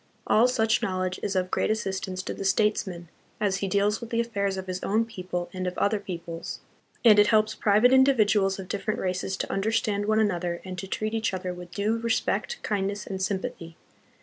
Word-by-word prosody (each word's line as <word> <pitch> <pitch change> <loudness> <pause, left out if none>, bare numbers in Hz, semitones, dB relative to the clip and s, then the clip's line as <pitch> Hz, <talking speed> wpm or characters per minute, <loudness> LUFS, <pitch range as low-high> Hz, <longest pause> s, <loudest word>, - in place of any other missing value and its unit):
All 225 +3 +5
such 225 -3 +2
knowledge 185 -1 -2
is 200 - -2
of 185 0 0
great - - +1
assistance 190 -3 -2
to - - -4
the - - -6
states 210 +2 +2
man 175 -2 -7 0.3
as 200 -3 +1
he 195 - -2
deals 200 +3 +1
with 235 - -7
the 230 - 0
affairs 200 -4 -1
of 190 - -4
his 185 0 -4
own 220 +3 +1
people 180 -5 -5
and 185 -1 -3
of 180 - -4
other 205 +1 +2
peoples, 170 -3 -6 0.5
and 210 -3 +8
it 205 - +6
helps 215 -1 +3
private 215 +5 +4
individuals 215 -7 +4
of 190 -2 -7
different 205 +2 -2
races 185 +1 -2
to - - -3
understand 205 0 0
one 215 0 +3
another 175 -5 0
and 185 -1 -6
to 195 - -6
treat 215 +3 -2
each 220 -3 0
other 185 -1 -4
with 180 0 -9
due 210 +5 -1
respect, 235 - -1
kindness, 200 -1 -2
and 190 -1 -5
sympathy. 185 -4 -3
200 Hz, 200 wpm, -26 LUFS, 185-215 Hz, 0.5 s, and